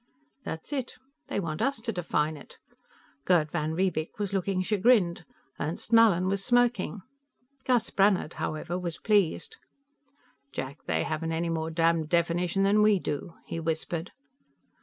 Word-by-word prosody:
That's 160 - -6
it. 265 -3 -3 0.3
They - - -2
want 160 -3 -3
us 275 +2 +1
to 225 - -2
define 160 -5 -1
it. 145 - -13 0.7
Gerd 155 -2 +3
van 160 -1 -1
Riebeek 175 -3 -1
was 205 -1 -3
looking 190 -1 0
chagrined; 195 -4 +3 0.3
Ernst 165 +9 -4
Mallin 215 -6 +6
was 195 +1 -1
smirking. 240 -5 +1 0.6
Gus 245 -3 +2
Brannhard, 195 -5 +2
however, 165 +3 -3
was 170 -3 -4
pleased. 210 - +1 0.9
"Jack, 135 +3 -6
they - - +1
haven't 160 +1 -2
any 165 +1 -1
more 160 -1 -2
damn 165 -1 +2
definition 170 +3 +1
than 205 +2 +4
we 210 -1 +5
do," 165 0 -4
he 165 - -4
whispered. 165 +2 -3
180 Hz, 140 wpm, -28 LUFS, 160-205 Hz, 0.9 s, Mallin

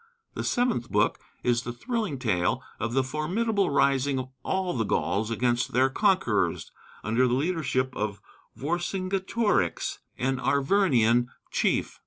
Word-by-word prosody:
The - - -4
seventh 240 - 0
book - - +2 0.2
is 120 -1 +2
the 120 - -5
thrilling 215 - -3
tale 95 -8 0 0.2
of 115 0 -2
the 135 0 +3
formidable 190 - 0
rising 140 -1 +2
of 130 0 -4
all 190 -1 -1
the 115 - +1
Gauls 105 +1 0
against 120 +1 0
their 130 +2 +3
conquerors, 195 +4 +1 0.3
under 115 +5 +2
the 125 - +1
leadership 140 -4 0
of 105 -2 -3 0.4
Vercingetorix, 185 - -1 0.2
an 130 +1 0
Arvernian 135 - +3 0.2
chief. - - 0
135 Hz, 130 wpm, -27 LUFS, 120-185 Hz, 0.4 s, the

